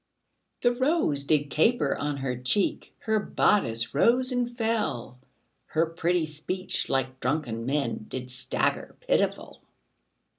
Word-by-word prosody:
The 245 - +4
rose 255 - +1
did 145 -1 +1
caper 235 +10 +2
on 145 0 -2
her 135 -2 -2
cheek, 125 +11 -1
Her 220 -1 +1
bodice 115 - +1
rose 250 - +3
and 245 -1 -1
fell, 220 - -1 0.5
Her 160 +1 +2
pretty 165 +1 0
speech, 155 +5 -3
like 130 -1 -1
drunken 125 -4 -2
men, 135 -6 -1
Did 125 -1 -5
stagger 130 +1 0
pitiful. - - -1
155 Hz, 120 wpm, -27 LUFS, -, 0.5 s, The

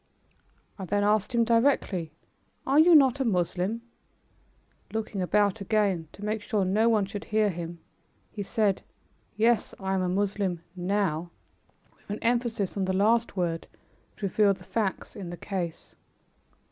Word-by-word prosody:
I 190 - -4
then 205 +3 0
asked 210 +3 +1
him 235 - +4
directly, 230 - +1 0.5
"Are 275 +3 +4
you 335 +1 +7
not 275 -2 +5
a - - +2
Moslem?" 190 +1 -1 1.1
Looking 220 -3 -3
about 205 +2 +2
again, 195 -5 +1
to 205 - -8
make 215 0 -1
sure 205 -3 0
no 215 +5 +3
one 215 -3 +3
should 200 +2 -7
hear 215 -1 +2
him, 170 0 -6 0.5
he 205 - -6
said, 200 0 +1 0.5
"Yes, 230 0 +2
I 190 -1 -2
am 190 - +1
a 180 - 0
Moslem 190 -2 -1
now," 180 -3 -1 0.7
with - - -30
an 205 - -2
emphasis 235 -4 0
on 195 -2 0
the 190 - 0
last 220 +3 +2
word 170 -2 -1 0.5
which - - -14
revealed 200 0 +3
the 185 - -15
facts 200 0 -2
in 190 -4 -6
the 175 - -7
case. 175 -4 -5
205 Hz, 155 wpm, -27 LUFS, 185-220 Hz, 1.1 s, you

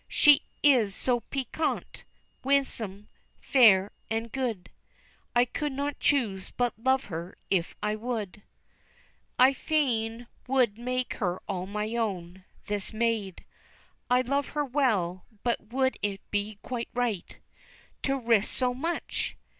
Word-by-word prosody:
She 295 -2 +6 0.2
is 240 -9 +5
so 245 -2 +1
piquant, 275 +5 -3 0.4
winsome, 230 -7 0 0.3
fair, 210 -7 +5 0.2
and 225 +1 -2
good, 235 -8 -3 0.6
I 240 +1 +6
could 290 +3 -3
not 285 +1 -3
choose 215 -10 +1
but 245 -2 0
love 260 +3 +2
her 170 0 -6 0.2
if 180 -3 +1
I 210 0 +1
would. 215 -3 -4 1.0
"I 260 +2 +7
fain 245 -6 0 0.2
would 250 -5 +2
make 250 +1 -1
her 180 -2 0
all 185 -2 -3
my 210 +3 -3
own, 190 -5 -3 0.2
this 205 -1 -2
maid, 220 -4 -1 0.6
I 250 0 +5
love 280 +3 0
her 295 - +2
well, 215 -10 0 0.2
but 235 -2 -1
would 260 +1 +1
it 200 -1 -1
be 205 0 -1
quite 245 -2 -4
right 240 -7 -1 0.6
To 275 0 +1
risk 230 -5 +3
so 250 -1 +1
much? 330 +7 -3
235 Hz, 130 wpm, -28 LUFS, 205-260 Hz, 1.0 s, I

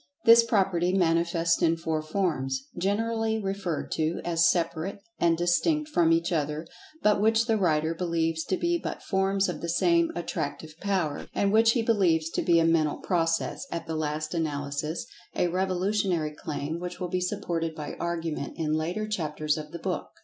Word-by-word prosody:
This 230 0 +8
property 190 -5 +1
manifests 170 -2 +2
in 165 -1 +3
four 160 -1 -2
forms, 155 -6 -1
generally 220 +4 0
referred 195 -5 -3
to 160 +2 0
as 170 0 +3
separate 170 +2 -1 0.2
and 170 -1 +3
distinct 300 - +1
from 165 - +3
each 165 +2 +2
other, 150 -1 -1 0.4
but 210 -1 +4
which 225 +1 +3
the 225 -1 +2
writer 160 -5 +1
believes 165 -2 -1
to 185 - 0
be 345 0 0
but - - -5
forms 195 0 +1
of 175 -4 -4
the 170 - -3
same 170 -1 +3
Attractive 155 -2 -4
Power, 185 -7 -1
and 200 0 +1
which 225 +1 +5
he 235 - +1
believes 175 -8 +2
to - - -1
be 170 -1 +4
a 165 - +3
Mental 160 -2 +2
Process, 165 +8 -1
at 165 - -4
the 160 - -4
last 155 +1 -2
analysis 150 0 -2 0.3
(a 175 - +1
revolutionary 185 -3 0
claim, 150 +1 -4
which 180 0 -6
will 180 - -2
be 180 +1 -1
supported 170 -4 -2
by 150 -2 -6
argument 165 -4 -3
in 155 -2 -1
later 175 +7 -1
chapters 155 -6 -1
of 155 -1 -6
the 170 - -5
book). 180 +2 -3
170 Hz, 170 wpm, -27 LUFS, 160-195 Hz, 0.4 s, This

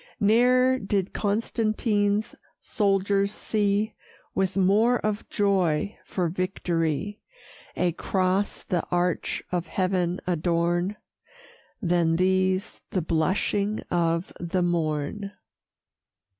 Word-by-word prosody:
Ne'er 250 +4 +4
did 195 -2 -1
Constantine's 215 -1 0 0.3
soldiers 200 -1 +1
see, 210 0 0 0.4
With 190 0 0
more 210 +6 +4
of 215 -1 -3
joy 195 -3 +1
for 180 -2 -1
victory, 180 +1 -2 0.5
A 180 -1 +1
cross 185 +3 -1
the 175 -2 -1
arch 175 0 0
of 180 -1 -1
heaven 185 -1 0
adorn, 175 +2 0 0.9
Than 170 -2 +2
these 185 +1 +1
the 185 -6 -1
blushing 195 +6 0
of 170 0 0
the 175 +1 -1
morn. 170 +4 -1
190 Hz, 90 wpm, -26 LUFS, 175-205 Hz, 0.9 s, Ne'er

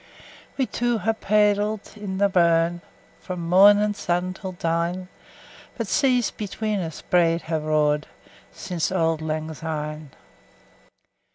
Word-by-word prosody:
We 265 - +2
twa 240 -1 -1
hae 220 +2 0
paidl't 210 0 +1
i' 200 -3 -5
the 200 +1 +4
burn, 170 -2 +2 0.4
Frae 185 - -6
mornin' 200 +4 +5
sun 180 -1 -1
till 190 0 -7
dine; 170 0 -1
10 185 0 -8 0.7
But 230 - -2
seas 250 +3 +2
between 210 0 -3
us 165 -4 -6
braid 170 -1 +2
hae 160 -1 -2
roar'd 150 -1 +1 0.4
Sin' 180 -2 -7 0.2
auld 165 -2 +1
lang 155 0 -3
syne. 155 -1 -5
180 Hz, 125 wpm, -24 LUFS, 165-205 Hz, 0.7 s, mornin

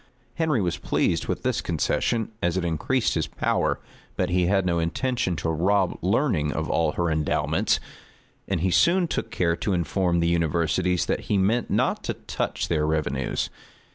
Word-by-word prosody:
Henry 155 -8 +1
was 85 -2 -1
pleased - - 0
with - - -3
this - - 0
concession, 115 -2 0
as 90 +1 +1
it 90 - -1
increased 85 - 0
his 80 - -1
power; - - 0 0.4
but 90 -1 -1
he 90 -1 +2
had 95 0 +2
no 85 -2 +1
intention 90 +3 -1
to 80 +1 -2
rob 95 +3 +2
learning 75 -1 +1
of 80 +1 -2
all 80 -2 +1
her 85 -1 0
endowments; 75 -1 +1 0.7
and 85 - -1
he 95 0 +1
soon 175 - +4
took - - -3
care 85 -2 +1
to 100 - -1
inform 85 +1 +1
the 85 - +2
universities 85 +2 +1
that - - -2
he 105 - +3
meant 110 +6 +1
not - - +1
to - - -2
touch - - -3
their 75 -2 +1
revenues. 80 -1 -1
85 Hz, 170 wpm, -25 LUFS, 80-100 Hz, 0.7 s, soon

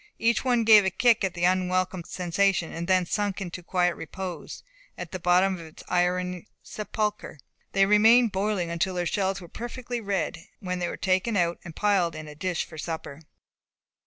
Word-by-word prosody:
Each 230 0 +1
one 245 -3 +2
gave 215 -2 +8
a 190 - +2
kick 235 +3 +3
at 190 -2 -1
the 175 - -4
unwelcome 185 0 +1
sensation, 180 -1 0
and 170 +1 -4
then 185 -1 +3
sunk 205 +2 -1
into 180 -2 -6
quiet 180 0 +1
repose, 185 +2 -7 0.3
at - - -7
the 185 - -5
bottom 180 +2 +3
of 165 - -9
its 155 - -14
iron 180 +1 0 0.2
sepulchre. 210 -4 -3 0.4
They 195 0 +4
remained 220 +3 +5
boiling 190 -3 -1
until 170 +2 -1
their 175 0 -1
shells 195 +2 0
were 175 - -10
perfectly 240 +4 -6
red, 190 -5 -3
when 180 -1 -3
they 175 - -1
were - - -5
taken 190 +3 +1
out, 170 -1 +1
and 165 -2 -10
piled 190 -6 +1
in 155 0 -7
a 150 - -9
dish 175 +3 -2
for 160 - -11
supper. 160 -2 -6
185 Hz, 185 wpm, -26 LUFS, 175-205 Hz, 0.4 s, gave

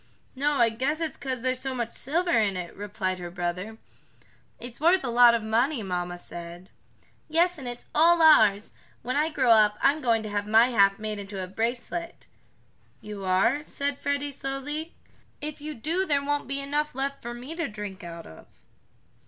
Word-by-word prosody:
"No, 290 +3 +1
I 235 -5 +4
guess 265 +7 -1
it's 320 -4 -3
'cause 260 -3 -4
there's 255 0 0
so 265 0 -3
much 235 -2 -3
silver 345 +6 -1
in 210 -4 +2
it," 175 -1 -6
replied 200 -2 -3
her 175 -1 -6
brother. 180 +5 -4 0.8
"It's 245 +2 -8
worth 345 +2 +4
a 245 - -2
lot 240 0 +7
of 230 - -2
money, 230 +4 +1
mamma 175 -2 -3
said." 175 +1 -10 0.6
"Yes, 340 +2 +2
and 260 - -7
it's 240 0 -7
all 340 +2 +5
ours. 215 -11 +5 0.3
When 255 - -2
I 305 +2 +2
grow 260 -6 +2
up 210 -2 +5
I'm 290 +3 +3
going 230 -4 +2
to 215 - -5
have 205 0 -2
my 225 +3 +5
half 200 -4 +4
made 215 -1 -4
into 195 -1 -6
a - - -3
bracelet." 240 - -4 0.7
"You 205 -2 -8
are?" 195 +10 +2
said 280 -1 -3
Freddie 285 0 -1
slowly. 280 +4 -5 0.4
"If 300 0 -6
you 305 0 -6
do 325 +10 -1
there 280 -2 +1
won't 290 -2 -1
be 275 +1 -2
enough 290 +1 -2
left 275 +1 -3
for 240 0 -6
me 250 +6 -7
to 335 -3 -2
drink 210 -2 -7
out 170 -1 -8
of." 80 - -14
240 Hz, 185 wpm, -26 LUFS, 205-290 Hz, 0.8 s, lot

